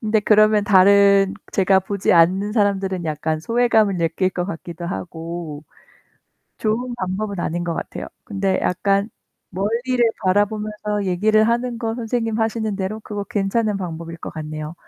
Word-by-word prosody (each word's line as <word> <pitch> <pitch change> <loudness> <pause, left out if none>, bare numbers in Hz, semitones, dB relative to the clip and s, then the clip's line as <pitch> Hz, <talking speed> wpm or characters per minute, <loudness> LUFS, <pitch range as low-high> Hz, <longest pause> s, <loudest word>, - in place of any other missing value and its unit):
근데 215 -1 +1
그러면 215 0 +4
다른 200 0 +5 0.2
제가 190 0 +3
보지 200 +1 0
않는 185 +5 +3
사람들은 195 -4 0
약간 155 0 -2
소외감을 220 -1 +2
느낄 170 +3 0
것 180 -1 -3
같기도 170 -1 -7
하고 165 -3 -6 0.9
좋은 240 +3 -1
방법은 195 0 -3
아닌 175 +1 -2
것 170 -1 -2
같아요. - - -6 0.2
근데 195 -2 -1
약간 200 +3 +1 0.4
멀리를 230 +7 -1 0.3
바라보면서 210 +1 0
얘기를 215 +4 +3
하는 240 0 -1
거 225 -2 -2
선생님 225 -1 -2
하시는 220 -1 -1
대로 200 +3 -3
그거 205 -1 -5
괜찮은 205 +2 0
방법일 165 -3 -6
것 - - -7
같네요. 155 0 -6
200 Hz, 325 characters per minute, -21 LUFS, 180-215 Hz, 0.9 s, 다른